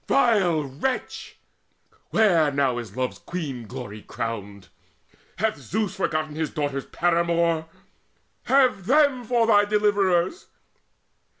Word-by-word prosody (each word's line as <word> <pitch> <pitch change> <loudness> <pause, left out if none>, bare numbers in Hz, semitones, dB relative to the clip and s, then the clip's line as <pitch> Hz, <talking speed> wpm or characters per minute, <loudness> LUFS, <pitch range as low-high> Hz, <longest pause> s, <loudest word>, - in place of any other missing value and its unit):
Vile 195 - +3
wretch! 145 - -4 0.7
where 175 -9 +3
now 135 -3 +1
is 115 -1 -9
Love's 130 -1 -2
Queen 140 -10 -6
glory 120 -4 -8
crowned? 100 -5 -6 0.7
Hath 215 +2 0
Zeus 215 -3 -3
forgotten 155 -4 -2
his 155 -1 -2
daughter's 145 -2 -3
paramour? 170 -1 +1 0.8
Have 255 -8 +3
them 280 -2 +3
for 235 0 +2
thy 205 -2 +5
deliverers! 205 - +1
170 Hz, 105 wpm, -24 LUFS, 135-210 Hz, 0.8 s, thy